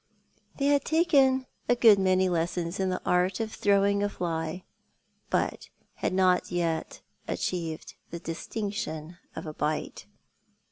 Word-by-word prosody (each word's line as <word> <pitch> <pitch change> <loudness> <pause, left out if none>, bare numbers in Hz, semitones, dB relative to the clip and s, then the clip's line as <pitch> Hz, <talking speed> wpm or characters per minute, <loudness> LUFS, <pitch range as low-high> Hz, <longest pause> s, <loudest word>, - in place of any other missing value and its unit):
They 275 - 0
had 285 -1 +3
taken 280 -6 +3 0.2
a 245 - +5
good 225 -4 +6
many 185 0 +3
lessons 170 +1 -1
in 190 -1 +1
the 185 - -1
art 180 +1 +2
of 220 -1 -3
throwing 200 0 +2
a 205 - +1
fly, 165 -1 -3 0.7
but - - -1 0.2
had - - -2
not 185 -1 +2
yet 170 -2 -2 0.3
achieved 165 -3 -3 0.2
the 170 - -5
distinction 170 -1 -5 0.2
of - - -6
a 155 - -6
bite. 150 0 -3
185 Hz, 135 wpm, -28 LUFS, 170-205 Hz, 0.7 s, good